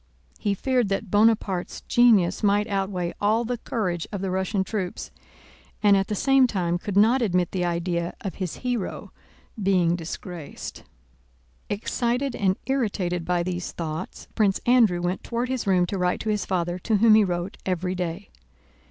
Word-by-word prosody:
He 205 Hz, -1 st, 0 dB
feared 250 Hz, 0 st, +1 dB
that 195 Hz, 0 st, -2 dB
Bonaparte's 205 Hz, -4 st, +2 dB
genius 215 Hz, -7 st, +4 dB
might 205 Hz, 0 st, +3 dB
outweigh 195 Hz, -4 st, -2 dB
all 220 Hz, +3 st, +2 dB
the 245 Hz, 0 st, -3 dB
courage 180 Hz, -9 st, -2 dB
of 200 Hz, -3 st, -4 dB
the 190 Hz, -1 st, -2 dB
Russian 190 Hz, +1 st, 0 dB
troops, 190 Hz, -3 st, -4 dB, 0.7 s
and 205 Hz, -1 st, +6 dB
at 195 Hz, 0 st, +1 dB
the 210 Hz, -, -2 dB
same 270 Hz, +4 st, +4 dB
time 175 Hz, -5 st, -1 dB
could 200 Hz, +1 st, -3 dB
not 230 Hz, +6 st, +5 dB
admit 180 Hz, -6 st, +1 dB
the 185 Hz, -2 st, -1 dB
idea 170 Hz, 0 st, -2 dB
of 195 Hz, -, -4 dB
his 180 Hz, -3 st, -2 dB
hero 245 Hz, -5 st, -3 dB, 0.5 s
being 180 Hz, -3 st, +3 dB
disgraced. 170 Hz, -1 st, -7 dB, 0.9 s
Excited 240 Hz, +5 st, -1 dB
and 190 Hz, -1 st, +1 dB
irritated 195 Hz, -10 st, -1 dB
by 175 Hz, -1 st, +1 dB
these 180 Hz, 0 st, -4 dB
thoughts 160 Hz, +1 st, -5 dB
Prince 205 Hz, -4 st, +2 dB
Andrew 225 Hz, -8 st, +4 dB
went 180 Hz, +1 st, -2 dB
toward 240 Hz, +1 st, -2 dB
his 260 Hz, -5 st, -2 dB
room 180 Hz, -2 st, +4 dB
to 190 Hz, +2 st, -4 dB
write 180 Hz, 0 st, +1 dB
to 220 Hz, -, -3 dB
his 210 Hz, -2 st, -1 dB
father, 175 Hz, -1 st, -1 dB
to 220 Hz, +4 st, 0 dB
whom 220 Hz, +1 st, +6 dB
he 215 Hz, 0 st, +6 dB
wrote 175 Hz, 0 st, -3 dB
every 185 Hz, 0 st, -1 dB
day. 180 Hz, +1 st, -4 dB
195 Hz, 165 wpm, -25 LUFS, 180-220 Hz, 0.9 s, and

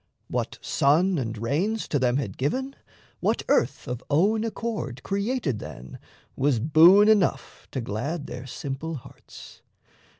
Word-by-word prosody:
What -, -, -3 dB
sun 165 Hz, +5 st, +2 dB
and 115 Hz, -3 st, -4 dB
rains 165 Hz, -, -1 dB
To 145 Hz, -, +1 dB
them 125 Hz, 0 st, +2 dB
had 110 Hz, -9 st, -3 dB
given, 260 Hz, -, -2 dB, 0.4 s
what -, -, 0 dB
earth -, -, +1 dB
of 125 Hz, 0 st, -4 dB
own 200 Hz, +9 st, +3 dB
accord 220 Hz, -, -4 dB
Created 200 Hz, -, -1 dB
then, 65 Hz, -10 st, -9 dB, 0.4 s
was 135 Hz, -3 st, +1 dB
boon 165 Hz, -, +7 dB
enough 210 Hz, -5 st, +1 dB
to 130 Hz, -, -4 dB
glad 140 Hz, +9 st, -3 dB
Their 125 Hz, -1 st, -7 dB
simple 140 Hz, +5 st, -5 dB
hearts. 130 Hz, -, -13 dB
145 Hz, 135 wpm, -25 LUFS, 125-200 Hz, 0.4 s, boon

